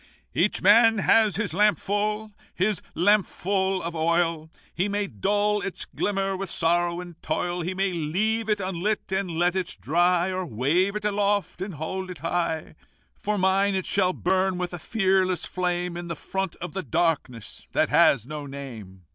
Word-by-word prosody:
"Each 210 - +1
man 225 +3 +6
has 215 0 +4
his 205 -5 -1
lampful, 210 +2 +1 0.2
his 190 0 +1
lampful 195 0 +1
of 170 0 -4
oil; 165 -1 +1 0.2
He 190 +4 0
may 205 0 0
dull 205 - 0
its 195 - -5
glimmer 195 -1 -1
with 195 -1 -4
sorrow 175 +1 +1
and 175 -2 -12
toil; 175 0 -2
He 180 +3 -3
may 190 0 0
leave 210 +8 -1
it 210 -1 +2
unlit, 190 +2 -2
and 190 -1 -1
let 175 +2 +1
it 185 -1 -3
dry, 175 +4 +2
Or 185 0 -2
wave 165 - +1
it 210 0 -4
aloft, 205 -2 0
and 190 -2 -4
hold 185 +5 -4
it 180 - -7
high: 165 +1 -2 0.4
For 210 0 -2
mine, 195 +1 +2
it 190 - -1
shall 185 -2 +2
burn 185 +1 0
with 180 0 -3
a 175 - -5
fearless 190 -2 +1
flame 180 -1 -2
In 175 0 -5
the 170 - -4
front 190 +3 -3
of 175 - -7
the 190 - -2
darkness 145 - -2
that - - +2
has 120 -5 +4
no 150 +1 -6
name. 115 -10 -9
185 Hz, 170 wpm, -25 LUFS, 170-200 Hz, 0.4 s, man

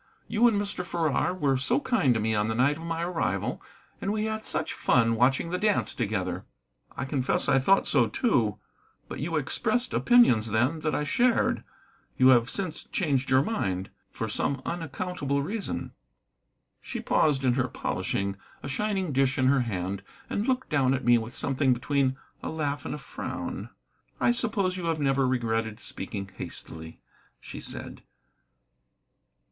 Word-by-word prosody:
"You 230 +2 +4
and 215 -4 +2
Mr. 200 -3 -3
Farrar 170 -2 0
were 140 -7 +1
so 130 - +1
kind 195 - +2
to - - +1
me 110 +1 0
on 105 0 +1
the 110 - -1
night 135 +5 +3
of 165 - -8
my 165 0 -2
arrival, 175 -1 -1 0.4
and 195 - -1
we 215 0 0
had 220 0 -3
such - - 0
fun 115 -2 +3
watching 135 +8 +2
the 180 - -1
dance 210 -1 +2
together." 95 -5 -2 0.5
"I - - -2
confess 130 -1 0
I 135 - +4
thought 195 +9 +4
so, 120 -6 +3
too. 115 - +1 0.5
But - - -7
you 165 +3 -2
expressed 220 - 0
opinions 180 - +5
then 125 +9 +1
that 155 0 -1
I - - 0
shared. 240 - +2 0.5
You 130 0 +6
have 120 -1 +5
since 185 0 -3
changed 140 -7 0
your 130 +1 +5
mind, 95 - -2 0.2
for - - -4
some 140 -2 -1
unaccountable 160 -3 -2
reason." 205 +6 -4 0.9
She - - -5
paused 145 -4 +2
in 125 -2 +3
her 130 0 +1
polishing, 100 -3 -2 0.3
a - - -4
shining 190 +4 -1
dish 135 0 +2
in 130 - +2
her 135 0 +4
hand, 95 -4 -3 0.3
and 205 - -1
looked 260 0 0
down 135 -3 +3
at 130 - -4
me 120 -1 +6
with 115 +2 -7
something 135 -1 +2
between 135 +1 0 0.2
a - - -4
laugh 145 -3 -2
and - - -3
a - - -6
frown. - - -5 0.5
"I - - +4
suppose 215 -7 0
you 180 - -4
have 165 -2 0
never 135 -2 +2
regretted 115 -3 -1
speaking 100 -4 -6
hastily," 80 0 -8 0.4
she - - -9
said. - - -6
140 Hz, 165 wpm, -27 LUFS, 120-180 Hz, 0.9 s, You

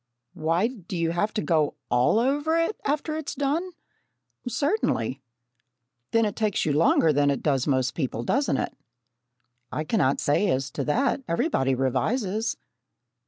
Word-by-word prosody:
"Why, 165 +5 +1
do 200 -7 -5
you 165 -1 0
have 205 +5 0
to 210 - 0
go 155 -4 +1 0.2
all 125 - +3
over 290 +7 +1
it, 330 +6 +1
after 300 +2 -1
it 315 - -5
is - - -5
done?" 295 +6 -1 0.8
"Certainly." 240 - 0 0.9
"Then 230 -1 +3
it 205 - -2
takes 215 -3 0
you 150 - +1
longer 155 +1 +4
than 145 0 +3
it 140 - -1
does 135 -3 +1
most 130 -2 +1
people, 125 -6 -3
doesn't 210 - +1
it?" - - -3 1.0
"I 155 - -2
cannot 155 - +1
say 190 +8 +2
as 135 -3 -1
to 140 - -3
that. 260 - +1
Everybody 165 - +1
revises." 200 - 0
175 Hz, 155 wpm, -26 LUFS, -, 1.0 s, longer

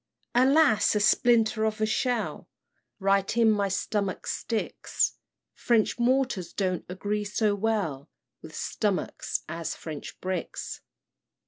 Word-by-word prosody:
"Alas! 260 -4 +4
a - - +3
splinter 225 +1 +3
of 220 0 0
a 215 - +2
shell 245 +1 -1 0.5
Right 195 +2 +1
in 225 -2 +5
my 205 -2 +1
stomach 195 0 -2
sticks; 225 -2 -1 0.4
French 235 0 +1
mortars 245 -8 +1
don't 185 -3 -1
agree 205 +3 -2
so 210 +1 +1
well 200 -10 -1 0.3
With - - -11
stomachs 205 -4 -2
as 165 0 -4
French 155 -3 -8
bricks. 185 -2 -4
210 Hz, 115 wpm, -27 LUFS, 190-230 Hz, 0.5 s, in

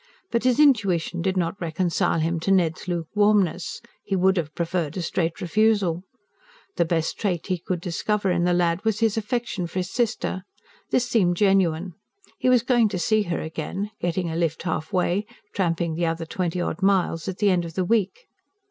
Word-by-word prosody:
But 235 +1 0
his 255 0 +3
intuition 195 - +3
did 190 +1 0
not 180 +2 -1
reconcile 170 0 0
him 165 +1 0
to 195 - -1
Ned's 180 -2 +1
luke 170 -2 -2
warmness; 205 -5 +1 0.2
he 195 - -2
would 190 +1 +3
have 155 -3 -3
preferred 170 -1 -2
a - - -1
straight 165 0 -1
refusal. 195 -2 +2 0.7
The - - +2
best 165 -1 -1
trait 185 -6 -1
he 185 -2 -1
could 180 +1 -3
discover 195 +3 -1
in 175 -1 +1
the 180 - +2
lad 175 +1 +1
was 220 -2 0
his 225 -2 +2
affection 225 -4 -2
for 170 - -7
his 185 0 -2
sister. 235 -5 -1 0.5
This 245 -1 +1
seemed 185 -7 +2
genuine: 185 -3 +2 0.5
he 255 - +2
was 250 -2 +4
going 240 -3 +3
to 195 - -3
see 215 +4 +2
her 170 - -1
again 165 +6 -4
getting 175 +1 -1
a - - -4
lift 165 -1 -1
halfway, 180 +4 -1 0.3
tramping 170 -3 0
the 170 +1 0
other 165 0 -2
twenty 180 +1 -2
odd 175 0 -3
miles 190 -4 +1
at 190 -1 -3
the 205 -2 +3
end 180 -2 +2
of 165 -1 -8
the 185 - 0
week. 225 - 0
180 Hz, 190 wpm, -24 LUFS, 170-205 Hz, 0.7 s, was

